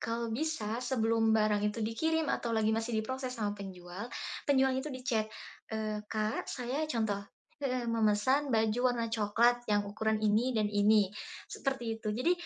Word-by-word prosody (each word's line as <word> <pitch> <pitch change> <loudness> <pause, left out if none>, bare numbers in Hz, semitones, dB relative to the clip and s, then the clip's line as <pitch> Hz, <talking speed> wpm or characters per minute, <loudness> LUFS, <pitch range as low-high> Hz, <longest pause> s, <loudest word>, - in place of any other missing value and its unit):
kalau 230 0 -2
bisa 235 -5 -2
sebelum 225 -3 +2
barang 215 -1 +3
itu 215 +1 -3
dikirim 320 +8 0
atau 240 - -2
lagi 220 0 +2
masih 225 +1 -1
diproses 255 +3 -3
sama 210 -2 -1
penjual, 190 +1 -7 0.4
penjualnya 265 -1 +3
itu 295 - -5
di-chat, 250 -5 -1 0.4
eee, 215 -1 -2
"Kak, 215 0 -1
saya" 250 +3 -2
contoh 220 -7 0 0.4
heeh, 255 -3 -1
"memesan 230 +5 +2
baju 220 +1 +2
warna 230 -1 -1
coklat 230 +3 +3
yang 205 -1 +2
ukuran 220 +2 0
ini 225 +4 +2
dan 215 - +3
ini," 205 -1 +4 0.3
seperti 240 -5 -3
itu. 215 - -3
Jadi, 250 +11 +2
225 Hz, 155 wpm, -32 LUFS, 215-250 Hz, 0.4 s, ini